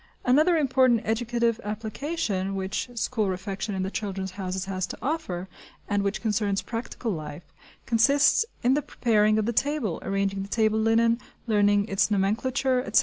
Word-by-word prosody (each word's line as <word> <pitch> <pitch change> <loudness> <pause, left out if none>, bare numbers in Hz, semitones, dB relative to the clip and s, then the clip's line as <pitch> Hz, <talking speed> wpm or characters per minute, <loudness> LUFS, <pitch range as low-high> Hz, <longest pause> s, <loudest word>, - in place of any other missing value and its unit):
Another 305 +7 +4
important 255 -5 +3
educative 235 +1 0
application 215 - -3
which 190 +5 -3
school 220 -2 0
refection 195 +2 -4
in 190 - -1
the 190 - -3
"Children's 195 -3 -4
Houses" 185 0 -4
has 185 -1 -2
to - - -7
offer, 235 - -3 0.4
and 205 -1 +1
which 200 +2 -2
concerns 205 -2 0
"practical 230 0 -4
life," 155 -2 -7 0.3
consists 275 - +4 0.2
in 250 +2 +4
the 295 - +2
preparing 215 -5 +2
of 215 - +1
the 235 - -1
table, 265 - 0
arranging 195 0 -1
the 195 - -6
table 220 -1 +2
linen, 230 +1 +3 0.3
learning 205 -2 +3
its 195 +1 +1
nomenclature, 250 +6 +1
etc. - - +3
215 Hz, 155 wpm, -26 LUFS, 195-240 Hz, 0.4 s, Another